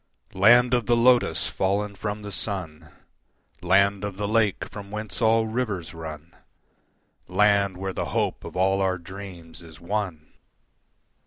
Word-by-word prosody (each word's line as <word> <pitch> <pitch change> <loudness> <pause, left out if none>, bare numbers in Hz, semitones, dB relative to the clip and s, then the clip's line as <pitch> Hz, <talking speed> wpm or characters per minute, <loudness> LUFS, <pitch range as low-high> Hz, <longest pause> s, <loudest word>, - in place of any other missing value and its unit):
Land 120 +6 +5
of 120 -3 +1
the 120 -1 +3
Lotus 120 +1 +3
fallen 100 +2 -1
from 105 +1 -5
the 100 - -7
sun, 85 -5 -4 0.7
Land 100 0 +3
of 100 -2 -4
the 105 0 -2
Lake 110 -2 +1
from 100 -1 -10
whence 105 +2 -5
all 115 0 +4
rivers 110 -7 -3
run, 80 0 -9 0.9
Land 100 0 +2
where 95 0 -4
the - - -3
hope - - -2
of - - -9
all 95 +1 +2
our 95 -1 +1
dreams 90 -2 -10
is 80 -3 -13
won! 90 -4 -4
100 Hz, 145 wpm, -25 LUFS, 90-105 Hz, 0.9 s, Land